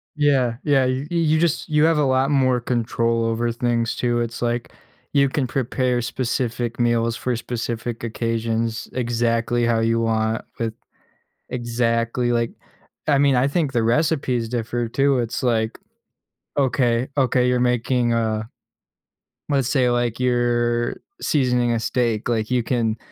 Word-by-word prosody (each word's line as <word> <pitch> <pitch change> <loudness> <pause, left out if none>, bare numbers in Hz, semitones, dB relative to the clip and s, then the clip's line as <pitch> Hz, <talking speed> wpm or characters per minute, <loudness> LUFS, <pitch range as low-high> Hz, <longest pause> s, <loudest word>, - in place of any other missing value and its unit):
Yeah, 135 -5 +2
yeah, 140 -3 +3
y 130 +2 -1
you 160 -2 +2
just 170 -1 0
you 150 0 +3
have 165 -1 +4
a 150 - +3
lot 135 +1 +2
more 130 -3 +3
control 115 -1 0
over 115 +1 0
things 115 -1 0
too. 120 -1 0
It's 120 +1 -3
like, 120 0 -1 0.4
you 140 -1 +4
can 135 -1 -1
prepare 125 -1 0
specific 120 -1 -2
meals 115 -1 +1
for 125 -1 -2
specific 120 0 -4
occasions 115 0 -2
exactly 120 -1 0
how 115 -1 +2
you 115 +1 +1
want 110 -1 0 0.2
with 115 -1 -1 0.8
exactly, 120 0 0
like, 115 -1 0 0.6
I 145 -2 +4
mean, 140 -1 +4
I 125 +2 +3
think 145 -2 0
the 115 -2 +2
recipes 130 -2 +1
differ 120 0 -2
too. 135 +2 +2
It's 120 +1 -3
like, 110 -2 0 0.8
okay, 125 -2 +1
okay, 125 -2 +2
you're 125 0 +2
making 125 0 +1
a 110 -1 -1 1.0
let's 135 -3 +1
say, 130 -4 +2
like, 120 -1 0
you're 120 -1 +1 0.3
seasoning 125 -4 +2
a 115 - 0
steak, 115 -3 -1
like, 110 -1 -1
you 125 -1 +2
can 115 -2 0
120 Hz, 145 wpm, -22 LUFS, 115-130 Hz, 1.0 s, have